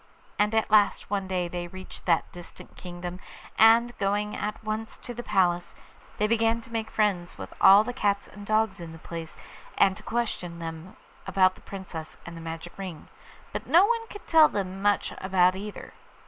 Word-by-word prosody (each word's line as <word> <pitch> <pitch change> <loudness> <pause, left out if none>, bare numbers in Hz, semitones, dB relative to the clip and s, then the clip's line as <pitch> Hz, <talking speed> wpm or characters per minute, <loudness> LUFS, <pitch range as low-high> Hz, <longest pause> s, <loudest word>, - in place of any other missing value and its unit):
And 210 +1 +2
at 220 -1 +1
last 205 -2 +3
one 195 -2 -1
day 180 -2 -1
they 175 0 -5
reached 185 +2 -11
that 165 -2 +2
distant 175 -1 -12
kingdom, 180 0 -7 0.4
and, 230 +2 +5
going 205 +1 0
at 210 +1 -4
once 215 +1 -4
to 245 - -8
the 240 - -6
palace, 175 -5 +1 0.4
they 210 - +2
began 225 +1 +2
to 230 - -16
make 225 -1 -3
friends 195 -5 0
with - - -8
all 200 +2 +8
the 245 - -4
dogs 200 -5 0
and 205 0 -12
cats 215 -2 +1
in 165 -1 -8
the - - -10
place, 165 0 -8 0.4
and 190 -1 +4
to - - -12
question 215 -7 -3
them 165 +1 -7 0.3
about 185 -1 +4
the - - -19
Princess 180 -5 -8
and 170 - -8
the 165 - -8
magic 165 +1 -7
ring; 185 -5 -7 0.4
but - - -5
no 350 +4 +6
one 460 +1 0
could 410 - -11
tell 315 -2 +6
them 190 -1 -4
much 205 -1 +1
about 185 -1 +3
either. 205 +2 -8
195 Hz, 190 wpm, -27 LUFS, 175-220 Hz, 0.4 s, all